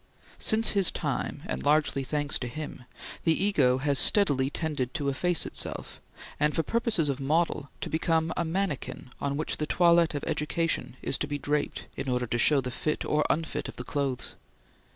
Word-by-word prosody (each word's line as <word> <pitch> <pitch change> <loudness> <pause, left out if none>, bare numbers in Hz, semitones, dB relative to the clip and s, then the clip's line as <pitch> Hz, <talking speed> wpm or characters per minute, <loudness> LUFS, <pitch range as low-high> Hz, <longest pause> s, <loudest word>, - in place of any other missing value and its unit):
Since 220 0 +2
his 195 -3 +4
time, - - -3
and 65 +1 -3
largely 145 - +2
thanks 145 +1 -1
to 125 - -3
him, 145 -1 -7 0.4
the 165 - +4
Ego 150 -11 +3
has 140 0 +2
steadily 140 -10 +4
tended 150 -3 -2
to 145 -4 0
efface 175 +5 +1
itself, - - -2 0.4
and, 150 0 +2
for 165 - +2
purposes 230 -8 +1
of 140 -1 -1
model, 150 0 0
to - - -3
become 160 0 +1
a - - 0
manikin 165 -7 -3
on 140 0 -1
which 155 - -2
the 150 - -2
toilet 170 -2 +4
of 145 - -3
education 160 -3 -1
is - - 0
to - - -1
be 145 - -2
draped 145 +1 -1
in 135 - -4
order 125 -1 0
to 120 +1 -1
show 145 +3 +4
the 125 0 -4
fit 150 +4 -2
or 150 0 +2
misfit 150 -2 -1
of - - -9
the 125 - -6
clothes. 135 -2 -2
150 Hz, 185 wpm, -28 LUFS, 135-165 Hz, 0.4 s, his